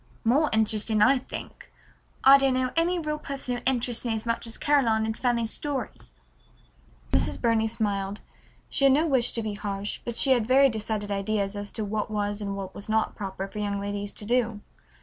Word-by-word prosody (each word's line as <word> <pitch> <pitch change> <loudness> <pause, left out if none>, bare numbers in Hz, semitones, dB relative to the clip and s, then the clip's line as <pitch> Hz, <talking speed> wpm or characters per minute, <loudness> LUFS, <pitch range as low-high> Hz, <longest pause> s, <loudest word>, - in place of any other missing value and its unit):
"More 275 +7 +3
interesting, 220 0 +2
I 265 +4 +5
think. - - -9 0.5
I 275 +1 +9
don't 270 -1 +2
know 255 0 0
any 340 +2 +2
real 305 -2 -3
person 275 -4 -4
who - - -10
interests 245 -2 +1
me 235 -2 -1
as 220 - -5
much 230 0 -1
as 225 - -2
Caroline 235 -7 +2
in 220 - -1
Fanny's 235 -1 0
story." 290 -3 -2 1.2
Mrs. - - +1
Burney 230 -2 +2
smiled. 205 -3 -2 0.5
She 275 - +1
had 270 - +6
no 310 +3 +2
wish 265 -6 +3
to 230 - -2
be 215 -1 -3
harsh, 200 0 -4
but 235 - -5
she 270 - +3
had 240 -4 +3
very 270 +2 +6
decided 215 -2 -3
ideas 200 0 -1
as 205 0 -4
to 220 - -2
what 210 +1 -2
was 205 0 -2
and 200 -1 -3
what 190 -1 -6
was 200 - -9
not 220 0 +1
proper 195 -1 -5
for 210 - -8
young 205 -1 -2
ladies 205 0 -3
to 210 - -2
do. 230 -2 0
220 Hz, 200 wpm, -26 LUFS, 205-255 Hz, 1.2 s, I